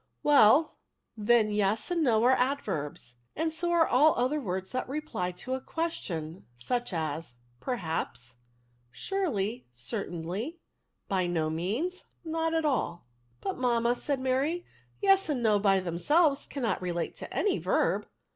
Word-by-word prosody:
'" - - -48
Well, 290 +1 +5 0.4
then, 215 0 +3
yes 210 - 0
and 345 -1 +1
no 230 -6 +3
are 250 - +6
adverbs, 195 - -1 0.2
and 320 +1 -1
so 345 +2 -1
are 340 -1 +4
all 300 +5 +5
other 260 +5 0
words 190 -4 -4
that 255 0 -3
reply 275 -11 -3
to 255 +8 -5
a 260 - -2
ques 330 +3 -2
tion, 160 - -6
such 240 - -2
as, 155 -5 -3 0.2
perhaps^ 160 - -3 0.6
surely, 245 - -2
certainty, 175 - -4 0.5
by 185 -2 +1
no 160 -3 0
means, 225 - -2 0.2
not 325 0 -1
at 320 -1 +1
all.'* 175 - -1 0.2
" 120 +1 -38
But, - - -3
mamma," 240 -1 +2
said 280 +2 -2
Mary, 270 +7 0 0.2
" - - -36
yes 390 -2 +4
and 260 -5 0
no, 210 -2 +4
by 195 -1 +4
themselves, 275 - +2
cannot 250 -9 -2
relate 175 -2 -2
to - - -8
any 410 - +1
verb - - +1
240 Hz, 155 wpm, -29 LUFS, -, 0.6 s, are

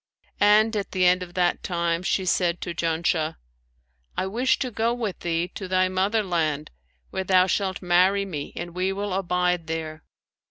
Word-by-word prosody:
And 215 +2 +5
at 200 -2 -3
the 185 -1 +2
end 180 +1 +4
of 175 -1 -8
that 175 -1 +1
time 170 -1 -1
she 185 +1 0
said 180 -1 +1
to 175 - -4
Janshah, 165 -1 0 0.8
'I - - 0
wish 235 +7 +1
to 255 -2 -3
go 230 +2 0
with 220 -6 -4
thee 170 0 -1
to 190 - -7
thy 185 0 +2
mother 195 +4 +1
land, 155 -5 -1 0.4
where 190 - -2
thou 185 -1 +4
shalt 190 0 -1
marry 185 +3 +3
me 150 -7 -5
and 175 -1 -6
we 185 +2 0
will 200 0 -3
abide 180 -2 0
there.' 160 -1 -4
180 Hz, 175 wpm, -25 LUFS, 170-195 Hz, 0.8 s, And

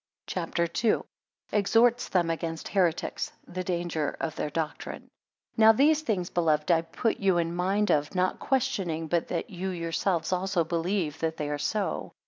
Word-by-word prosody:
CHAPTER 170 -1 -1 0.2
II. 225 - +5
1 - - -2 0.5
Exhorts 225 +4 +3
them 175 -3 +2
against 165 0 -4
heretics. 175 -5 0 0.2
8 - - -13
The 185 0 -2
danger 170 -4 -2
of 160 -1 -3
their 150 - -2
doctrine. 155 +1 -5 0.5
NOW 220 0 +8
these 295 +6 +4
things, 195 - -2
beloved, 155 -2 +2
I 165 -1 +4
put 220 +7 -1
you 190 -3 +3
in 170 0 0
mind 195 +4 +1
of, 145 +4 +1
not 185 0 +1
questioning 180 -11 0
but 170 +1 0
that 235 - -3
you 190 +1 -3
yourselves 170 0 -1
also 185 -1 +1
believe 165 -1 -1
that 160 0 -1
they 150 -1 -3
are 145 - -2
so. 205 +7 -2
175 Hz, 170 wpm, -28 LUFS, 165-195 Hz, 0.5 s, NOW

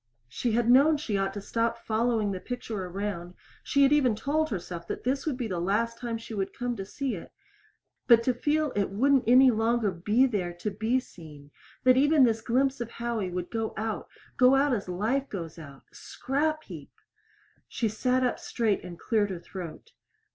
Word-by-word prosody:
She 220 - -2
had 235 0 +1
known 280 +5 +6
she 250 -8 -3
ought 195 0 0
to 205 - -4
stop 230 +3 -1
following 225 -2 0
the 185 - -4
picture 220 -4 -5
around, 180 -1 -5 0.3
she 280 - +2
had 275 +1 +5
even 260 -7 +3
told 300 +7 0
herself 170 -3 -5
this 270 +4 -2
would 280 -5 -1
be 245 -3 -3
the 180 -4 -3
last 230 +6 0
time 235 -2 -3
she 225 0 -9
would 195 -2 -3
come 245 -1 -2
to 195 - -5
see 275 +2 -3
it 175 - -8 0.8
but 230 -2 +7
to 255 - +2
feel 295 +4 0
it 200 -1 0
wouldn't 265 +7 +2
any 255 +2 +7
longer 225 -1 +1
be 210 +9 +2
there 195 -8 -2
to 190 +5 -4
be 220 +6 0
seen 150 - -13 0.3
that 255 0 +5
even 290 +1 +5
this 225 -2 +2
glimpse 265 +3 +1
of 235 - -4
Howie 235 -5 -3
would 180 0 -5
go 225 -1 -3
out 220 -1 -3 0.3
go 255 +1 +6
out 275 0 +3
as 200 -5 -3
life 230 +10 -1
goes 165 -4 -6
out 140 -4 -12
scrap 310 +3 -2
heap! - - -10 0.8
She 230 - -1
sat 250 +4 0
up 250 - 0
straight 220 -4 -1
and 175 -1 -9
cleared 215 -1 0
her 185 - -4
throat. 180 - -9
230 Hz, 190 wpm, -28 LUFS, 195-255 Hz, 0.8 s, but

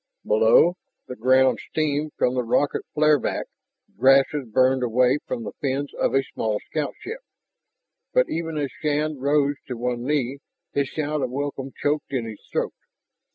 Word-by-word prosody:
Below, 115 +11 +5 0.3
the 125 - -6
ground 130 0 +4
steamed 150 -1 -1
from 125 - +1
a 125 - +1
rocket 125 +4 +1
flare 150 -1 +4
back, - - -2 0.5
grasses 135 +1 +4
burned 130 +3 +3
away 125 +3 +3
from 120 - -3
the - - -5
fins 140 +1 -2
of - - 0
a 135 - +3
small 110 -4 -2
scoutship. 160 - -4 0.9
But - - +3
even 165 -1 -3
as 145 -2 -2
Shann 150 -1 -1
rose 145 +1 +2
to 125 - -5
one 120 0 -2
knee, 140 -1 -1 0.3
his 140 -1 +1
shout 150 0 -2
of 130 - -1
welcome 135 0 -4
choked 145 -1 0
in 125 -3 -1
his 110 -2 -9
throat. - - -1
135 Hz, 155 wpm, -24 LUFS, 125-150 Hz, 0.9 s, Below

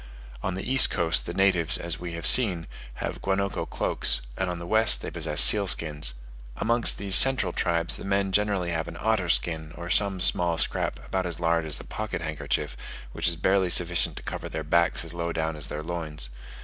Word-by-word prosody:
On 95 0 -4
the 95 - -7
east 135 +1 +5
coast 85 0 -1
the 85 - -6
natives, 95 -4 +1
as 85 -1 -5
we 85 -1 -7
have 85 -1 -7
seen, 95 -10 +5 0.3
have - - -6
guanaco 100 0 -3
cloaks, - - 0
and 95 -1 -3
on 90 - -5
the 85 - -9
west 110 +4 +2
they - - -6
possess 75 - +4
seal 100 -2 +7
skins. 75 -6 -2 0.4
Amongst 115 +1 +2
these 100 -1 -2
central 135 0 +5
tribes 85 -1 -1
the - - -11
men 100 0 -2
generally 100 -3 -1
have 80 -1 -4
an 85 - -9
otter 110 -6 -1
skin, 80 -2 0
or 85 +1 -7
some 100 -1 +1
small 85 -2 +4
scrap - - -1
about 95 -1 -3
as 85 -1 -5
large 85 -1 -1
as 75 - -2
a - - -11
pocket 110 -6 -6
handkerchief, 75 -2 -4 0.4
which - - -3
is 85 - +2
barely 95 +2 0
sufficient 85 0 +3
to - - -9
cover - - -7
their 80 0 -6
backs 85 +1 0
as 85 - -11
low 85 0 -4
down 80 -1 -4
as 75 - -7
their 75 - -7
loins. 80 -6 -5
85 Hz, 205 wpm, -25 LUFS, 80-95 Hz, 0.4 s, seal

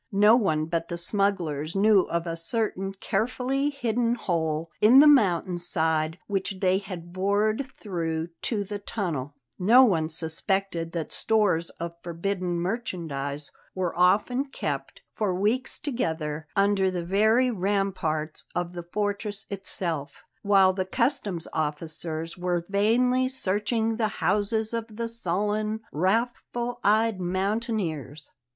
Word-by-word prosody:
No 210 +3 +6
one 160 -10 +1
but 165 +1 -2
the 170 - -4
smugglers 170 -5 0
knew 200 -1 +4
of 170 0 -1
a 165 -1 -3
certain 195 +2 -2
carefully 250 +8 -1
hidden 240 -4 0
hole 165 -6 -2
in 235 +6 +8
the 295 - +8
mountain 185 - +4
side 160 -1 +1
which 195 -1 -2
they 185 0 +3
had 175 -3 -8
bored 205 +6 +1
through 165 -8 -4
to 210 -4 -1
the 205 +1 -5
tunnel; 160 - -3 0.2
no 230 +8 +7
one 165 -10 +2
suspected 165 +1 -1
that 165 -3 -3
stores 205 -7 +1
of 170 0 -4
forbidden 175 +1 -2
merchandise 165 - -3 0.2
were 185 -2 -2
often 210 +9 +3
kept, 270 - -5
for 200 -4 -1
weeks 215 +7 0
together, 160 - -3
under 195 -1 +3
the 180 -2 -3
very 220 +7 +3
ramparts 185 -6 -1
of 175 0 -1
the 175 -1 -8
fortress 205 0 -2
itself, 170 -7 -4 0.2
while 195 -2 +5
the 190 0 -1
customs 215 - -1
officers 160 +1 -3
were 175 -1 -1
vainly 250 +6 +3
searching 220 -1 -1
the 225 -2 +1
houses 215 +3 0
of 230 -1 -4
the 230 +1 -2
sullen, 215 0 -1
wrathful 235 +6 -1
eyed 215 -1 +3
mountaineers. 185 - -2
195 Hz, 130 wpm, -26 LUFS, 170-220 Hz, 0.2 s, in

